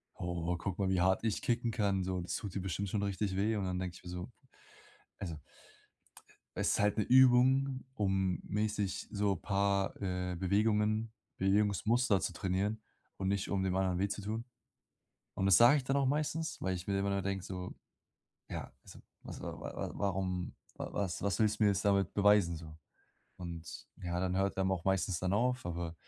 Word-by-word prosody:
„Oh, 85 0 -2
guck 95 +1 -4
mal, 100 - +1
wie 95 -2 +2
hart 95 +4 +3
ich 110 - 0
kicken 120 -1 0
kann, 100 -4 +1
so 95 -1 -1
das 90 - -3
tut 100 -3 -6
dir 95 - -1
bestimmt 95 +2 -2
schon 100 0 -1
richtig 100 -1 -1
weh.“ 105 +3 +1
Und 100 - -1
dann 90 0 -2
denke 90 -2 -4
ich - - -14
mir 90 - -8
so 90 +6 -6 0.9
also 85 -5 -4 1.2
Es - - +2
ist - - +1
halt 105 +1 +2
'ne 105 - +3
Übung, 130 +2 +5
um 95 -5 0
mäßig 105 -2 -2
so 100 -1 +1
paar, 100 -1 0
äh, 90 -2 -2
Bewegungen, 105 +3 +1 0.3
Bewegungsmuster 105 +3 +2
zu 90 - -2
trainieren 100 +5 -1 0.4
und 95 - -2
nicht, 100 -1 0
um 95 -1 +1
dem 95 -1 0
anderen 95 -1 +1
weh 100 - +2
zu 100 +1 -4
tun. 110 +3 -3 0.9
Und 95 - 0
das 95 -3 +7
sage 120 +7 +7
ich 140 - -2
dann 135 +1 +1
auch 140 -1 +2
meistens, 155 +3 -1
weil 95 0 -1
ich 90 +2 -6
mir 100 - +1
immer 100 0 0
nur 100 -1 0
denke 95 -1 -2
so, 90 -2 -5 0.8
ja, - - -5
also, - - -13 0.2
was - - -8
wa - - -5
wa - - -6
wa - - -3
warum 95 -2 -2 0.2
wa - - -6
was 95 -4 -2
was 100 +2 0
willst 110 -1 +2
du 105 - +5
mir - - +6
jetzt 100 +1 -1
damit 100 -2 +2
beweisen 100 -4 +4
so? 80 -1 -10 0.6
Und 85 -2 -7 0.2
ja, 85 0 -2
dann 95 0 0
hört 100 +1 +1
er 95 0 +1
auch 95 -2 -1
meistens 95 -2 +1
dann 90 0 0
auf, 125 +4 +1
aber 85 -1 -4
100 Hz, 200 wpm, -33 LUFS, 90-105 Hz, 1.2 s, das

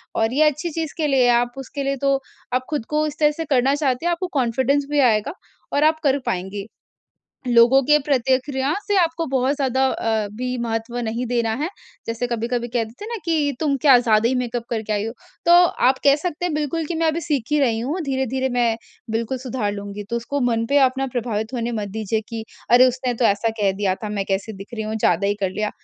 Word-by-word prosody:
और 225 +1 +1
ये 300 +4 +4
अच्छी 300 +4 -4
चीज़ 320 -2 -4
के 310 - +1
लिए 265 -3 +3
आप 245 0 -3
उसके 275 +1 -5
लिए 275 0 0
तो 275 0 +4 0.4
आप 255 0 0
खुद 285 -7 -2
को 305 0 +1
इस 300 +1 -7
तरह 300 -1 +4
से 325 - -3
करना 270 +1 +3
चाहते 285 0 -1
हैं। 345 - +2
आपको 365 +2 -2
कॉन्फिडेंस 260 +4 +1
भी 295 - +2
आएगा 215 +8 -1 0.4
और 285 - +2
आप 315 - -16
कर 280 -1 +2
पाएँगे। 190 +2 -3 0.8
लोगों 240 +3 +6
के 300 +2 +5
प्रतिक्रिया 265 +1 +1
से 410 - +1
आपको 330 -1 +1
बहुत 265 +2 +1
ज़्यादा 265 -2 +1
अ, 220 -4 -1
भी 250 +2 -3
महत्व 230 0 -3
नहीं 235 +1 -2
देना 235 -2 0
है, 320 - 0 0.4
जैसे 230 +2 -2
कभी-कभी 240 0 -2
कह 235 -1 0
देते 230 - -11
हैं - - -6
ना 470 - -3
कि 310 -4 +1
तुम 290 -3 +1
क्या 270 -4 +7
ज़्यादा 225 -1 +3
ही 260 - 0
मेकअप 245 -1 -2
करके 220 -2 -2
आई 205 0 0
हो, 225 - -4 0.3
तो 345 - +6 0.4
आप 260 0 +2
कह 280 0 +6
सकते 345 +2 -4
हैं 350 -4 -1
बिल्कुल 305 +2 -1
कि 345 - -3
मैं 325 0 +1
अभी 315 +2 0
सीख 295 -6 -1
ही 300 - +4
रही 230 -4 +2
हूँ, 290 +10 -2
धीरे-धीरे 265 -1 -1
मैं 235 -2 +2 0.3
बिल्कुल 230 +3 -2
सुधार 245 -5 -2
लूँगी। 205 0 -6
तो 235 - 0
उसको 260 +5 -3
मन 230 0 0
पे 285 - +5
अपना 265 +1 -3
प्रभावित 225 -2 -2
होने 235 -1 -2
मत 210 -2 -3
दीजिए 215 +1 -2
कि 225 -1 -5 0.3
अरे, 250 +2 +7
उसने 250 0 -2
तो 235 +1 -1
ऐसा 205 +2 +2
कह 195 -1 +3
दिया 195 -1 0
था 215 +2 -7
मैं 205 -2 -2
कैसे 195 +3 -1
दिख 200 +4 -10
रही 220 - -3
हूँ, 215 - -3
ज़्यादा 200 -2 +2
ही 205 - +1
कर 190 -2 0
लिया। 210 +2 -2
250 Hz, 230 wpm, -22 LUFS, 225-285 Hz, 0.8 s, क्या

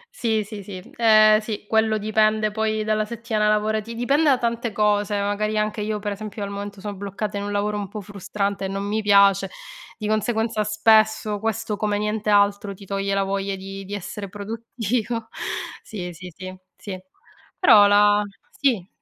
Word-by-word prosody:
Sì, 220 -2 0
sì, 205 0 -8
sì. 190 -1 -8 0.2
Ehm 215 -2 +6
sì, 215 -1 -6
quello 220 -1 +2
dipende 215 0 +2
poi 215 0 -1
dalla 215 0 +1
settimana 220 -1 -1
lavorati 215 +2 0
dipende 275 +7 +2
da 265 - +4
tante 235 -1 -2
cose. 205 0 +1
Magari 210 +2 -1
anche 215 0 -1
io, 215 0 -2
per 205 0 -4
esempio, 210 +1 -6
al 200 - -4
momento 200 0 -6
sono 205 0 -5
bloccata 200 +1 -4
in 200 - -3
un 205 - -4
lavoro 210 +1 -1
un 200 - -4
po' 210 - -7
frustrante 200 0 -3
e - - -1
non 195 +1 -3
mi 210 +2 -1
piace, 200 -1 +4 0.5
di 215 - -4
conseguenza 220 +1 0
spesso 215 0 +3
questo, 225 0 -2
come 210 -1 0
niente 210 0 -2
altro, 200 -1 +2
ti 195 - -13
toglie 195 0 -2
la 195 - +2
voglia 195 0 -2
di 195 +1 -8
di 200 +2 -5
essere 200 +1 -6
produttivo. 225 +2 -3 0.5
Sì, 180 -4 -7
sì, 180 +1 -10
sì, 185 0 -8 0.2
sì. 200 -3 -6 0.6
Però, 210 - +7
la 205 0 +5 0.3
sì. 230 -10 0
210 Hz, 175 wpm, -23 LUFS, 200-220 Hz, 0.6 s, Però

